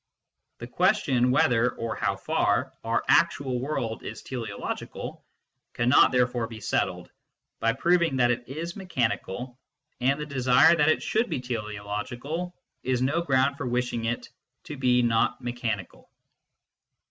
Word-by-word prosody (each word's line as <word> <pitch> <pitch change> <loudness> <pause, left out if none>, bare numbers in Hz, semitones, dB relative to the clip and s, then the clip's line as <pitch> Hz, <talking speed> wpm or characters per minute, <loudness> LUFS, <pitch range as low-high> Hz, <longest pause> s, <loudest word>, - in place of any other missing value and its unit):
The - - -7
question 125 -1 +2
whether, 125 -1 +3
or 115 -1 -3
how - - 0
far, - - 0
our - - 0
actual 130 -3 +2
world 120 -4 -3
is - - -8
teleological, 120 -4 -6 0.5
cannot, 120 +2 +5
therefore, 125 -2 +1
be 115 -1 -9
settled - - -2 0.5
by 115 0 +2
proving 170 +2 +2
that 120 -1 +4
it 120 0 -3
is 165 +5 -5
mechani 170 - -1
cal, 125 +6 -7 0.4
and 135 +3 +1
the 150 - -3
desire 140 +3 +5
that 150 -1 +3
it 155 - +2
should 225 +2 0
be - - -2
teleological 120 +8 -4 0.3
is 130 -1 0
no 150 +6 +1
ground 140 -2 +2
for 130 - -4
wishing 125 -1 -1
it 120 +1 -2 0.4
to 150 - -7
be 125 -2 +3
not 115 0 +2
mechanical. 120 -6 -4
125 Hz, 140 wpm, -26 LUFS, 120-140 Hz, 0.5 s, cannot